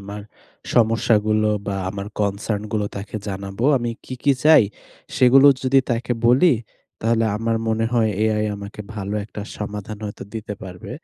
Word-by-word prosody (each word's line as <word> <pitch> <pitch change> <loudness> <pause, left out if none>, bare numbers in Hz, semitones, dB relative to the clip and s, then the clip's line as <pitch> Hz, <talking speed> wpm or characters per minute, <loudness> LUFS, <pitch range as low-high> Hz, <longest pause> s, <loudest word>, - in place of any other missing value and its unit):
আমার 100 +1 -7 0.5
সমস্যাগুলো 110 -2 +3 0.2
বা 100 - -1 0.2
আমার 100 0 -6
কনসার্ন 100 +1 -1
গুলো 105 -2 0
তাকে 100 +2 -6
জানাবো। 100 +3 -4
আমি 120 -1 -2
কি, 130 - -6
কি 140 - +4
চাই 155 -5 +8 0.5
সেগুলো 135 +2 +6 0.2
যদি 130 +1 +4
তাকে 120 +1 -1
বলি 135 +8 +5 0.5
তাহলে 115 0 +2
আমার 115 +1 0
মনে 110 0 +1
হয় 115 -2 +3
AI 110 -1 +1
আমাকে 100 +1 -9
ভালো 100 -1 -4
একটা 105 - -9 0.2
সমাধান 105 0 -6
হয়তো 105 - -6
দিতে 105 -2 -5
পারবে। 90 -1 -9
110 Hz, 150 wpm, -21 LUFS, 100-115 Hz, 0.5 s, চাই